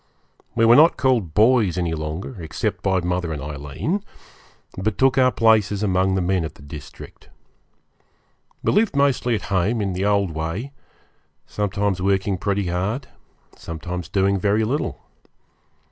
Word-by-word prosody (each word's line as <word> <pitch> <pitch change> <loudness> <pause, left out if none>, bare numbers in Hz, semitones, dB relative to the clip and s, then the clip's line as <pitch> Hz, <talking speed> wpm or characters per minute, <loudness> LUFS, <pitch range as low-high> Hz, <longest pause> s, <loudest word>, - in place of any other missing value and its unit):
We 115 -1 +3
were 115 +1 +7
not 160 +5 +6
called 120 - +1
boys 110 -5 +4
any 85 -2 -1
longer, 80 +7 -5
except 80 - -3
by 95 -1 +1
mother 90 -1 -2
and 75 - -4
Aileen, 75 - -4 0.7
but 100 +2 -2
took 135 -1 +3
our 130 0 +5
places 110 -3 +2
among 95 -1 +1
the 95 - 0
men 90 -1 +1
of 80 - -6
the - - -16
district. 70 -2 -11 1.3
We - - +2
lived 210 -5 +2
mostly 135 -4 +2
at - - -4
home, 100 +6 +1
in 100 -3 -1
the 95 +2 -2
old 100 -3 +2
way; 80 - -4 0.7
sometimes 100 -2 -1
working 95 0 0
pretty 100 0 -1
hard, 100 +10 -2 0.5
sometimes 85 +1 -6
doing 100 0 +1
very 105 +3 +2
little. 135 +8 -2
95 Hz, 145 wpm, -22 LUFS, 90-115 Hz, 1.3 s, were